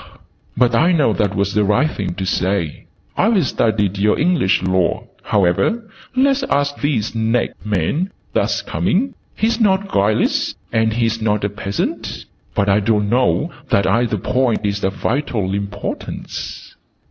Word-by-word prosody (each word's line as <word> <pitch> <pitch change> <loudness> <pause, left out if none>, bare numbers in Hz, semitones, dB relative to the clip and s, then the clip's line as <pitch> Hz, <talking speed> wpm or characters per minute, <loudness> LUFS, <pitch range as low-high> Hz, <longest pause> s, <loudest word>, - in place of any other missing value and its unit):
"But 125 -1 +3
I 165 +10 +4
know 145 -9 +3
that 105 -3 0
was 100 +1 0
the 105 0 +3
right 125 +10 +2
thing 95 -4 -4
to 95 - -3
say. 95 -3 -1 0.3
I've 200 -5 +3
studied 105 -5 0
your 105 +1 +3
English 160 - +2
Laws. 95 -1 +1 0.2
However, 105 - +1 0.3
let's 275 +1 +3
ask 145 0 +1
this 130 -7 0
next 115 +1 -1
man 105 - 0 0.2
that's - - 0
coming. 250 +8 0 0.2
He - - 0
is 230 +1 +1
not 195 -1 +2
guileless, 105 - +1 0.2
and 110 0 +2
he 115 +1 +1
is 115 0 -1
not 105 -1 +1
a 100 - +1
peasant 100 -1 -4 0.3
but 100 - +1
I 100 +1 +4
don't 105 0 +1
know 130 +7 +2 0.2
that 100 - +3
either 115 -2 +1
point 125 +1 0
is 100 0 -1
of 95 0 0
vital 110 -8 -1
importance." 100 0 -5
110 Hz, 155 wpm, -19 LUFS, 100-145 Hz, 0.3 s, I